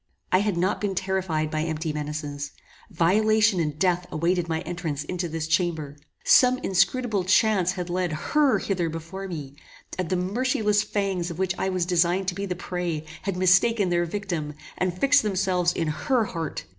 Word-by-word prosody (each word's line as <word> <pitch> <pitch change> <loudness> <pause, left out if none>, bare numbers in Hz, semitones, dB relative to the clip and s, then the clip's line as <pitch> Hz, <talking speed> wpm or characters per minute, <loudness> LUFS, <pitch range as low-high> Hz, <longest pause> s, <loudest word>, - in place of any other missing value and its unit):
I 185 - +5
had 205 -3 0
not 185 +3 0
been 200 -2 -1
terrified 185 -5 -1
by 155 - -1
empty 160 0 -2
menaces. 145 -1 -5 0.4
Violation 215 +3 +3
and 150 -3 -1
death 180 0 +1
awaited 170 +2 0
my 160 0 -1
entrance 170 -5 -4
into 175 +2 -3
this 160 0 -3
chamber. 160 -3 -1 0.3
Some 255 0 +6
inscrutable 195 +3 +1
chance 185 -1 +3
had 180 -2 -4
led 180 -1 -1 0.2
HER 300 -3 +4
hither 175 -4 -1
before 165 +5 -6
me, 145 -6 -7 0.4
and 180 -3 -1
the 185 - +1
merciless 210 +3 +1
fangs 195 -5 -2
of 170 - -6
which 190 -1 0
I 190 - 0
was 185 -2 0
designed 180 +1 +2
to - - -4
be 200 +1 -3
the 180 - -2
prey, 175 -3 -3 0.2
had 195 -2 -3
mistaken 185 +3 +4
their 175 0 +1
victim, 170 -5 -4 0.2
and 185 - 0
had 180 +1 -8
fixed 285 +1 +5
themselves 185 -4 +1
in 165 - -2
HER 230 - +1
heart. 165 -6 -5
180 Hz, 180 wpm, -25 LUFS, 165-195 Hz, 0.4 s, Some